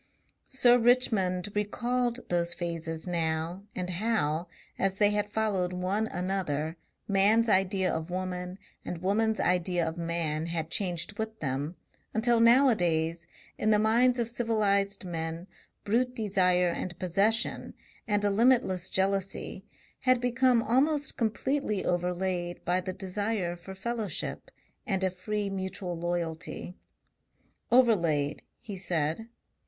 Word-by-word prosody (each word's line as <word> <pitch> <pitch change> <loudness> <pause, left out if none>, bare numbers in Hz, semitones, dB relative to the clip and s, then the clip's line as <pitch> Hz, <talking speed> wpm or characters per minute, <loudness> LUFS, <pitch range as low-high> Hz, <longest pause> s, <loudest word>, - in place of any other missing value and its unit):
Sir 245 -2 +5
Richmond 205 -6 +2
recalled 240 +4 -1
those 170 -1 0
phases 165 -2 -4
now, 170 +2 -2
and 180 -1 -3
how, 180 -4 0 0.3
as 195 0 +1
they 205 +1 +3
had 210 0 0
followed 200 -5 0
one 190 +4 -1
another, 180 -5 -2 0.3
man's 210 +4 +4
idea 190 -2 +2
of 160 +1 -3
woman 180 0 -4 0.3
and 175 0 -6
woman's 220 +3 +1
idea 175 -1 +1
of 160 +2 -4
man 165 -2 -1
had 165 -1 -3
changed 180 +1 -2
with 220 0 -4
them, 145 +4 -3 0.4
until 235 +1 +3
nowadays 175 - +3 0.3
in 215 - +1
the 215 - +5
minds 235 +4 +3
of 235 -2 0
civilized 210 -4 +1
men 165 0 -4 0.4
brute 250 +4 +1
desire 185 -5 +2
and 175 +1 -4
possession 200 +7 0 0.3
and 205 -1 +1
a 205 - +3
limitless 210 -5 +3
jealousy 195 0 -1 0.4
had 255 -1 +3
become 245 -1 +3
almost 280 +5 +2
completely 230 -1 -1
overlaid 180 0 -1
by 180 +1 +1
the 185 +1 -4
desire 190 -1 -2
for 180 +2 -10
fellowship 215 -3 -3 0.4
and 190 -3 0
a 185 - +2
free 205 +3 -3
mutual 190 -2 -4
loyalty. 170 0 -4 1.0
"Overlaid," 170 - +3 0.2
he 200 -4 -8
said. 170 +3 -1
190 Hz, 125 wpm, -29 LUFS, 175-220 Hz, 1.0 s, Sir